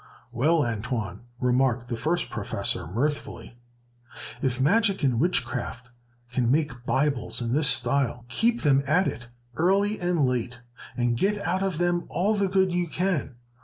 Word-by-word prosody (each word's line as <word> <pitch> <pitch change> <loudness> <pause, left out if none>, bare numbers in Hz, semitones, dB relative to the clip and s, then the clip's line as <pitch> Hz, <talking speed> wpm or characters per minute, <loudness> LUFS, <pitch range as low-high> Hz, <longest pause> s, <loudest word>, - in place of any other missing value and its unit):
"Well, 150 +5 +2
Antoine," 115 -3 -4
remarked 125 -1 +1
the 120 - -3
first 165 +8 -1
professor, - - -2
mirthfully, 120 - -3 0.8
"if 130 -1 0
magic 195 +6 +2
and 125 -4 +2
witchcraft 125 -6 -1 0.4
can 120 -1 +1
make 135 -5 -1
Bibles 135 -3 0
in 120 -1 -2
this 150 +1 +3
style, 130 -5 +1
keep 230 - +1
them 140 -3 +4
at 180 +7 +3
it 120 - -5 0.3
early 200 +5 +2
and 175 -5 +1
late, 125 -1 -2 0.4
and 120 -1 +1
get 200 - 0
out 185 0 0
of 190 -5 -1
them 175 0 0
all 200 +5 +1
the 200 -2 +1
good 190 -1 +2
you 175 -1 0
can. 170 -6 -1
140 Hz, 150 wpm, -26 LUFS, 120-180 Hz, 0.8 s, them